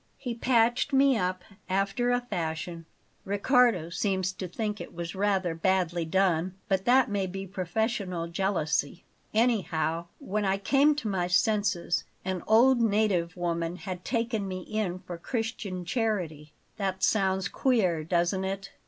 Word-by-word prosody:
He 245 Hz, -3 st, -4 dB
patched 240 Hz, +3 st, +2 dB
me 270 Hz, 0 st, +5 dB
up 185 Hz, -3 st, -1 dB, 0.3 s
after 195 Hz, +6 st, +1 dB
a 245 Hz, 0 st, +2 dB
fashion 165 Hz, -5 st, -4 dB, 0.4 s
Riccardo 205 Hz, -, +2 dB
seems 190 Hz, 0 st, 0 dB
to 185 Hz, -, -5 dB
think 210 Hz, +3 st, -3 dB
it -, -, -9 dB
was 170 Hz, 0 st, -5 dB
rather 190 Hz, -3 st, +1 dB
badly 175 Hz, 0 st, +1 dB
done, 185 Hz, 0 st, +1 dB
but 190 Hz, -1 st, 0 dB
that 255 Hz, +1 st, +5 dB
may 200 Hz, -2 st, -1 dB
be 195 Hz, +1 st, -5 dB
professional 190 Hz, -1 st, -2 dB
jealousy. 170 Hz, -4 st, -1 dB, 0.3 s
Anyhow, 175 Hz, -8 st, +1 dB
when 210 Hz, +2 st, -2 dB
I 195 Hz, 0 st, +1 dB
came 280 Hz, +8 st, +3 dB
to 260 Hz, -7 st, -4 dB
my 185 Hz, -3 st, 0 dB
senses, 200 Hz, -2 st, +1 dB, 0.2 s
an 185 Hz, -2 st, -2 dB
old 240 Hz, +3 st, +5 dB
native 200 Hz, -6 st, +1 dB
woman 170 Hz, -1 st, -1 dB
had 180 Hz, -1 st, -6 dB
taken 230 Hz, -4 st, -1 dB
me 185 Hz, -1 st, -4 dB
in 200 Hz, -2 st, -2 dB
for 175 Hz, -2 st, -8 dB
Christian 210 Hz, -3 st, -3 dB
charity 175 Hz, -, -2 dB, 0.3 s
that 190 Hz, -2 st, -2 dB
sounds 190 Hz, -3 st, +2 dB
queer, 190 Hz, -, +1 dB
doesn't 175 Hz, +3 st, +1 dB
it? 195 Hz, +1 st, -4 dB
190 Hz, 145 wpm, -28 LUFS, 175-220 Hz, 0.4 s, me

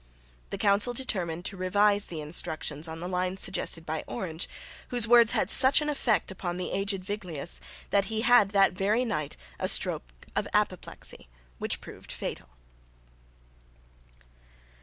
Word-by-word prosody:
The -, -, -4 dB
council 205 Hz, +4 st, +3 dB
determined 180 Hz, -9 st, -1 dB
to 200 Hz, -, -2 dB
revise 205 Hz, +2 st, +3 dB
the 160 Hz, -3 st, -6 dB
instructions 150 Hz, 0 st, -1 dB
on 160 Hz, 0 st, -7 dB
the 175 Hz, -, -4 dB
lines 185 Hz, +1 st, -2 dB
suggested 165 Hz, -2 st, +1 dB
by 160 Hz, 0 st, -3 dB
Orange, 165 Hz, -2 st, -4 dB, 0.4 s
whose 240 Hz, -2 st, +5 dB
words 235 Hz, -1 st, +6 dB
had -, -, +1 dB
such 260 Hz, +1 st, +5 dB
an 300 Hz, 0 st, -2 dB
effect 240 Hz, -9 st, 0 dB
upon 180 Hz, -2 st, -4 dB
the 180 Hz, -, -4 dB
aged 195 Hz, -1 st, 0 dB
Viglius, 170 Hz, -, -2 dB, 0.3 s
that 200 Hz, -1 st, +3 dB
he 220 Hz, +1 st, -2 dB
had 245 Hz, -4 st, +5 dB
that 195 Hz, -2 st, +4 dB
very 210 Hz, +7 st, +1 dB
night 155 Hz, -10 st, -3 dB, 0.2 s
a -, -, -1 dB
stroke -, -, +1 dB, 0.2 s
of -, -, 0 dB
apoplexy, -, -, -2 dB, 0.3 s
which -, -, -2 dB
proved -, -, -11 dB
fatal. -, -, -6 dB
195 Hz, 145 wpm, -28 LUFS, 170-215 Hz, 0.4 s, words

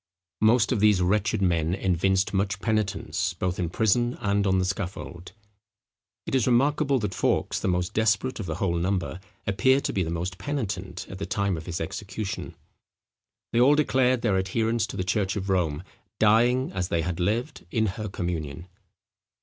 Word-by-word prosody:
Most 115 Hz, +1 st, +4 dB
of -, -, +1 dB
these 105 Hz, -2 st, +5 dB
wretched 100 Hz, +2 st, +1 dB
men 85 Hz, -1 st, +1 dB
evinced 95 Hz, +1 st, +1 dB
much 95 Hz, 0 st, 0 dB
penitence, 105 Hz, -4 st, -1 dB
both 90 Hz, +1 st, -2 dB
in 85 Hz, -2 st, -1 dB
prison 120 Hz, +6 st, +1 dB
and 100 Hz, 0 st, +1 dB
on 95 Hz, 0 st, +3 dB
the 95 Hz, -, +1 dB
scaffold. 90 Hz, -2 st, -5 dB, 0.9 s
It -, -, -5 dB
is 130 Hz, -3 st, +2 dB
remarkable 140 Hz, +3 st, +3 dB
that 105 Hz, -5 st, -2 dB
Fawkes, -, -, 0 dB
the -, -, -2 dB
most 90 Hz, -1 st, 0 dB
desperate 110 Hz, +3 st, +1 dB
of 100 Hz, -, -4 dB
the 80 Hz, -, -2 dB
whole 85 Hz, -2 st, 0 dB
number, 90 Hz, 0 st, -1 dB, 0.3 s
appeared 130 Hz, +7 st, +3 dB
to -, -, -2 dB
be 95 Hz, -, 0 dB
the 80 Hz, -, -1 dB
most 90 Hz, +2 st, -3 dB
penitent 95 Hz, -11 st, -4 dB
at 95 Hz, -, -9 dB
the 100 Hz, -, -4 dB
time 100 Hz, -1 st, 0 dB
of 80 Hz, 0 st, -8 dB
his 90 Hz, 0 st, -3 dB
execution. 105 Hz, 0 st, -5 dB, 1.0 s
They 120 Hz, -, +3 dB
all 135 Hz, +4 st, +6 dB
declared 130 Hz, -4 st, +2 dB
their 105 Hz, -5 st, +2 dB
adherence 110 Hz, +4 st, 0 dB
to -, -, -7 dB
the 90 Hz, -, -1 dB
church 100 Hz, 0 st, 0 dB
of 100 Hz, -1 st, -2 dB
Rome, 85 Hz, -4 st, 0 dB, 0.3 s
dying, 120 Hz, +4 st, +3 dB
as 95 Hz, -1 st, -2 dB
they 85 Hz, -2 st, 0 dB
had 90 Hz, +1 st, -3 dB
lived, 115 Hz, -, -2 dB
in 110 Hz, +4 st, +1 dB
her 105 Hz, +1 st, -3 dB
communion. 85 Hz, -3 st, -4 dB
100 Hz, 175 wpm, -26 LUFS, 90-110 Hz, 1.0 s, all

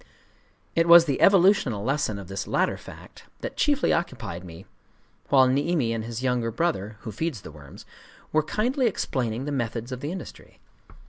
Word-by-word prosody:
It 165 Hz, 0 st, +3 dB
was 170 Hz, 0 st, +9 dB
the 140 Hz, -4 st, -1 dB
evolutional 185 Hz, -, +4 dB
lesson 135 Hz, -4 st, -1 dB
of 100 Hz, -3 st, -9 dB
this 95 Hz, +1 st, -5 dB
latter -, -, +1 dB
fact -, -, -13 dB, 0.2 s
that -, -, -5 dB
chiefly 290 Hz, -1 st, +2 dB
occupied 90 Hz, -, -3 dB
me 85 Hz, -2 st, -11 dB, 0.6 s
while 130 Hz, -2 st, +5 dB
Niimi 140 Hz, -2 st, +1 dB
and 115 Hz, -1 st, -3 dB
his 115 Hz, +2 st, -6 dB
younger 125 Hz, -3 st, 0 dB
brother 110 Hz, -, -2 dB
(who 110 Hz, -, -6 dB
feeds 145 Hz, -, -3 dB
the -, -, -10 dB
worms) 70 Hz, -3 st, -13 dB, 0.5 s
were 155 Hz, -, +3 dB
kindly 240 Hz, -, 0 dB
explaining 125 Hz, -, -2 dB
the 145 Hz, -, -3 dB
methods 120 Hz, -2 st, -3 dB
of 130 Hz, -, -5 dB
the 145 Hz, +4 st, -4 dB
industry. 185 Hz, -1 st, -9 dB
130 Hz, 170 wpm, -25 LUFS, 110-170 Hz, 0.6 s, was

